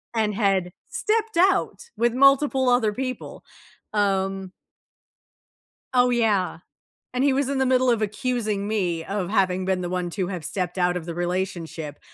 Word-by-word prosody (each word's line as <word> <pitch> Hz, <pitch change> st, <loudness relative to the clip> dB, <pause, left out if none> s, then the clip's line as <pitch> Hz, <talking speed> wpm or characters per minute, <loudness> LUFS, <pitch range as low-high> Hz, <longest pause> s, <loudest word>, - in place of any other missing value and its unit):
and 215 Hz, -2 st, +1 dB
had 195 Hz, -4 st, +1 dB, 0.2 s
stepped 440 Hz, -3 st, -1 dB
out 390 Hz, +5 st, +2 dB
with 235 Hz, 0 st, +2 dB
multiple 275 Hz, 0 st, +4 dB
other 245 Hz, -3 st, +3 dB
people, 255 Hz, +1 st, -5 dB, 0.5 s
um 195 Hz, -2 st, 0 dB, 1.4 s
Oh, 250 Hz, 0 st, +4 dB
yeah, 210 Hz, -8 st, +1 dB, 0.5 s
and 255 Hz, +2 st, 0 dB
he 280 Hz, -2 st, +4 dB
was 275 Hz, 0 st, 0 dB
in 280 Hz, -, -1 dB
the 265 Hz, -, +2 dB
middle 255 Hz, 0 st, +3 dB
of 230 Hz, -2 st, +2 dB
accusing 215 Hz, -2 st, -1 dB
me 180 Hz, -6 st, -1 dB
of 195 Hz, 0 st, -3 dB
having 185 Hz, -3 st, +1 dB
been 185 Hz, -1 st, 0 dB
the 175 Hz, -, -3 dB
one 180 Hz, -1 st, -2 dB
to 185 Hz, -1 st, -2 dB
have 180 Hz, -4 st, -5 dB
stepped 180 Hz, +1 st, -3 dB
out 180 Hz, 0 st, +2 dB
of 165 Hz, -, -7 dB
the 170 Hz, -, -5 dB
relationship, 175 Hz, -3 st, -3 dB
205 Hz, 160 wpm, -24 LUFS, 185-255 Hz, 1.4 s, multiple